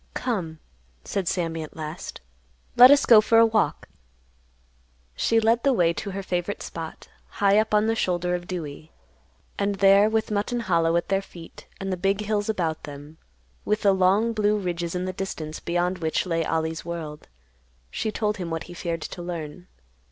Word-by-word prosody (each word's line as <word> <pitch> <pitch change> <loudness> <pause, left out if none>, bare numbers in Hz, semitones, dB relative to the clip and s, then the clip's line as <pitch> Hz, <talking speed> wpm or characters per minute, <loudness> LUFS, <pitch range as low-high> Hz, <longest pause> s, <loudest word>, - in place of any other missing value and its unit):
"Come," 180 -10 -3 0.5
said 195 -3 -3
Sammy 165 -3 -1
at 155 - -9
last. 155 +1 -7 0.5
"Let 250 +1 +10
us 285 0 +6
go 225 -3 +8
for 225 +1 +3
a 230 - +8
walk." 220 -1 0 1.3
She 225 - +2
led 225 +1 +2
the 275 +1 +3
way 170 -7 +3
to 200 - -5
her 195 0 -5
favorite 180 +2 -3
spot, 165 -1 -8 0.3
high 200 +1 +4
up 220 0 0
on 210 0 +3
the 225 - +2
shoulder 180 -4 0
of 175 0 -3
Dewey, 160 -3 -6 0.7
and 200 0 0
there, 195 +2 +5
with 220 0 -1
Mutton 210 +4 -1
Hollow 165 -5 +1
at 170 - 0
their 195 0 +2
feet 170 -4 -13
and 195 -1 -3
the - - -3
big 195 +3 0
hills 210 0 -1
about 165 -7 -2
them, 145 +2 -11 0.4
with 210 +1 -1
the 200 -1 +5
long 195 +5 +3
blue 210 -1 +2
ridges 175 -3 -3
in 180 0 -2
the 185 - -3
distance 165 -5 -5
beyond 175 +2 -1
which 160 +1 -1
lay 165 -2 0
Ollie's 160 0 -2
world, 160 -3 -7 0.6
she 220 - -2
told 210 -1 -1
him 180 -3 -5
what 165 0 -3
he 175 - -11
feared 170 -2 -4
to 175 - -7
learn. 175 0 -6
185 Hz, 180 wpm, -25 LUFS, 165-210 Hz, 1.3 s, Let